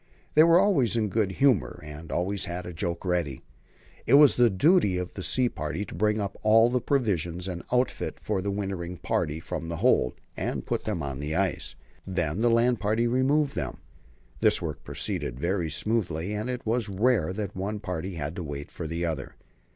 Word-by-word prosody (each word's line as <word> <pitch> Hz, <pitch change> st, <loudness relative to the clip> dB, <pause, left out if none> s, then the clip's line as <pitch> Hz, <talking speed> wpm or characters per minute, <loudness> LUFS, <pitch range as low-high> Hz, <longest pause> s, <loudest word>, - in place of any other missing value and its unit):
They 155 Hz, -, +7 dB
were 165 Hz, +1 st, +6 dB
always 140 Hz, -, +3 dB
in 110 Hz, -, +2 dB
a -, -, -3 dB
good 100 Hz, -2 st, 0 dB
humour, 100 Hz, -, +2 dB
and 75 Hz, +2 st, -9 dB
always 95 Hz, +3 st, -1 dB
had 90 Hz, 0 st, -5 dB
a 90 Hz, -, -6 dB
joke 85 Hz, +2 st, -3 dB
ready. 85 Hz, -7 st, -1 dB, 0.6 s
It 130 Hz, -, +6 dB
was 145 Hz, -1 st, +8 dB
the 120 Hz, -1 st, +5 dB
duty 100 Hz, -, +3 dB
of 90 Hz, 0 st, -4 dB
the 95 Hz, -, -6 dB
sea 125 Hz, +6 st, +2 dB
party 80 Hz, -1 st, -4 dB
to -, -, -9 dB
bring 105 Hz, +4 st, +1 dB
up 100 Hz, -2 st, -3 dB
all 115 Hz, +2 st, +5 dB
the 125 Hz, 0 st, +1 dB
provisions 90 Hz, -, 0 dB
and 90 Hz, -2 st, -4 dB
outfit 125 Hz, 0 st, 0 dB
for 95 Hz, -, -2 dB
the 100 Hz, -, -2 dB
wintering 95 Hz, -3 st, -3 dB
party 75 Hz, -1 st, -1 dB
from 80 Hz, 0 st, -5 dB
the 85 Hz, -, -3 dB
hold, 90 Hz, -, +2 dB, 0.2 s
and -, -, -3 dB
put -, -, -2 dB
them 100 Hz, -8 st, -2 dB
on 70 Hz, -1 st, -4 dB
the 75 Hz, +2 st, -3 dB
ice. 95 Hz, -4 st, -1 dB, 0.3 s
Then 90 Hz, -2 st, -1 dB
the 120 Hz, +1 st, +3 dB
land 115 Hz, +1 st, +3 dB
party 110 Hz, +3 st, +1 dB
removed 135 Hz, +4 st, +2 dB
them. -, -, -4 dB, 0.6 s
This -, -, +4 dB
work -, -, -5 dB
proceeded 60 Hz, 0 st, -2 dB
very 85 Hz, 0 st, 0 dB
smoothly, 90 Hz, 0 st, -1 dB
and 105 Hz, +4 st, -3 dB
it 125 Hz, -1 st, -4 dB
was 115 Hz, -1 st, 0 dB
rare 105 Hz, -2 st, +2 dB
that 100 Hz, -1 st, -4 dB
one 100 Hz, +3 st, -3 dB
party 90 Hz, -2 st, -4 dB
had 80 Hz, +1 st, -4 dB
to 90 Hz, -, -3 dB
wait 70 Hz, -1 st, -6 dB
for 80 Hz, -, -5 dB
the 85 Hz, +2 st, -2 dB
other. 80 Hz, -5 st, -4 dB
95 Hz, 200 wpm, -27 LUFS, 85-115 Hz, 0.6 s, was